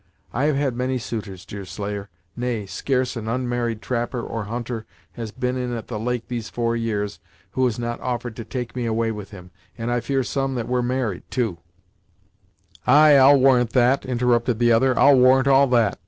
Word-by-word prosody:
I 130 +5 0
have 150 -1 +2
had 135 -3 0
many 130 +1 -1
suitors, 105 -5 -6
Deerslayer 100 +1 -6 0.3
nay, 120 -4 -2
scarce 130 +5 -1
an 110 -2 -5
unmarried 120 -2 -2
trapper 120 0 -2
or 115 -2 -4
hunter 115 +1 -5 0.2
has 115 -2 -6
been 125 +3 -2
in 125 -1 -3
at 115 - -9
the 110 -3 -4
Lake 120 +1 -2
these 120 -2 -4
four 115 -1 -1
years, 105 -3 -2 0.3
who 130 - 0
has 120 -3 0
not 120 0 -4
offered 120 -2 -3
to 115 - -5
take 125 +1 -5
me 120 -2 -2
away 115 0 0
with 105 -3 -7
him, 90 -3 -12 0.3
and 115 +1 -3
I 120 - +1
fear 135 +2 -1
some 135 +1 -2
that 120 -2 -3
were 125 0 +1
married, 120 -6 -1
too 115 -10 -1 0.7
" - - -32
"Ay, 150 +1 +7
I'll 140 +1 +7
warrant 125 -3 +4
that!" 125 +2 +3
interrupted 120 -1 +1
the 120 0 +3
other 125 +2 +3
"I'll 140 -2 +6
warrant 130 +1 +5
all 135 0 +5
that! 115 -6 +2
120 Hz, 195 wpm, -23 LUFS, 115-130 Hz, 0.7 s, Ay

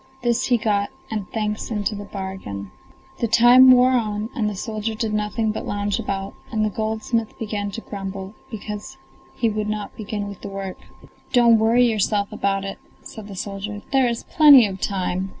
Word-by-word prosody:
This 240 -1 +1
he 245 - +4
got, 205 -2 0 0.2
and 210 -4 -3
thanks 210 -1 -2
into 210 -2 -1
the 205 0 -6
bargain. 190 - -6 0.5
The 235 - +1
time 240 +3 +7
wore 255 0 +7
on, 220 -2 -1
and 215 -3 0
the 205 - -5
soldier 215 +2 -3
did 220 -1 -2
nothing 210 +1 0
but 215 - -5
lounge 205 0 -1
about, 195 0 -3 0.2
and 215 -2 +1
the 215 - -1
goldsmith 220 +1 -2
began 210 -2 -3
to 230 - -6
grumble, 195 -1 -6 0.2
because 215 +4 -7 0.4
he 230 - +1
would 215 -1 -1
not 210 -1 -4
begin 210 -1 -4
with 200 -2 -9
the - - -6
work. 195 -1 -6 0.5
"Don't 235 -3 +6
worry 230 +3 +4
yourself 210 -2 0
about 195 0 -1
it," 195 - -6 0.2
said 215 -3 -10
the 200 - -8
soldier, 205 +2 -5
"there 265 -2 +4
is 235 -1 -2
plenty 290 -7 +7
of 195 -2 -5
time! 190 -1 -1
210 Hz, 185 wpm, -22 LUFS, 200-225 Hz, 0.5 s, time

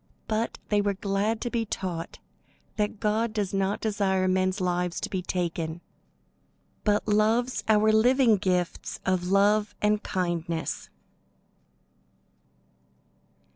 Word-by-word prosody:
But 220 +1 -1
they 210 -1 +3
were 200 -1 0
glad 205 +2 -1
to 240 - -3
be 235 -1 0
taught 180 -5 -4 0.6
that 210 -1 -1
God 215 +1 0
does 205 -3 -2
not 195 +1 0
desire 195 -3 +1
men's 185 +1 +1
lives 180 -1 -1
to - - -4
be 190 - -1
taken, 170 -2 -3 1.0
but 210 0 +1
loves 220 +4 +2
our 215 0 +4
living 240 0 +5
gifts 180 -3 -1
of 185 -1 0
love 205 +2 +3
and 210 0 +2
kindness. 170 -3 -2
200 Hz, 115 wpm, -27 LUFS, 185-215 Hz, 1.0 s, living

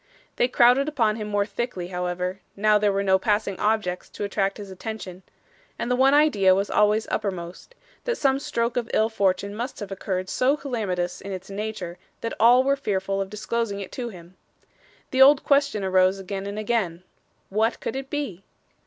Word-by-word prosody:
They 245 - +3
crowded 250 +3 +4
upon 225 -7 +1
him 215 -2 -4
more 205 -1 +1
thickly, 200 -3 -4
however, 180 +1 -3 0.2
now 210 +1 +3
there 205 -1 +2
were 200 0 0
no 190 -1 +3
passing 205 -1 0
objects 210 -4 0
to - - -6
attract 195 -1 -1
his 200 -2 -8
attention; 190 -2 -7 0.6
and 240 - -2
the - - +3
one 270 +2 +5
idea 205 -12 +5
was 200 +1 -1
always 210 +1 +3
uppermost, 185 - -4 0.3
that 480 -1 -1
some 270 -2 +2
stroke 235 -3 -2
of 235 -2 -1
ill 220 +1 +3
fortune 200 -1 0
must 240 +5 -5
have 205 -1 -7
occurred 185 -1 -3
so 260 +8 +2
calamitous 195 -11 -3
in 195 - -7
its 190 +1 -7
nature 195 -4 -5 0.2
that 230 - -3
all 240 +3 +6
were 275 +1 +2
fearful 195 -6 -1
of 195 - -4
disclosing 210 0 -2
it 195 - -7
to 245 -2 -4
him. 175 -3 -13 0.8
The 260 - +2
old 280 +1 +7
question 280 -7 +2
arose 185 0 +3
again 195 +1 -5
and 200 +1 -5
again 205 -6 -1 0.5
What 220 +4 +1
could - - -4
it 270 0 -5
be? 265 - -4
210 Hz, 185 wpm, -24 LUFS, 190-240 Hz, 0.8 s, old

